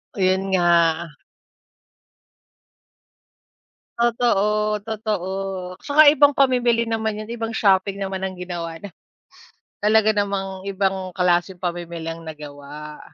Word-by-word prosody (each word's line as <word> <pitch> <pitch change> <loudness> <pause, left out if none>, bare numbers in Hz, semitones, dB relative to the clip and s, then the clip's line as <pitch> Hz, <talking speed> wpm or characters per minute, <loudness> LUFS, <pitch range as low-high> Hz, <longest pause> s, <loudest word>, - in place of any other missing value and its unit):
Oh, - - -7
yun 190 +1 +1
nga. 170 -2 +3 2.9
Totoo, 215 -3 +1
totoo. 215 -4 -3 0.5
Tsaka 300 +1 +5
ibang 290 -1 +5
pamimili 245 -4 +2
naman 220 -1 -2
yun, 215 - -13
ibang 230 -1 -4
shopping 200 -2 +2
naman 190 -1 -4
ang 190 -1 -3
ginawa 170 -2 -5
na 205 - -9 0.9
talaga 215 +1 +4
namang 195 -1 -2
ibang 190 -1 -1
klaseng 180 0 +1
pamimili 170 -2 -5
ang 165 0 -9
nagawa. 150 -1 -9
195 Hz, 105 wpm, -22 LUFS, 175-220 Hz, 2.9 s, Tsaka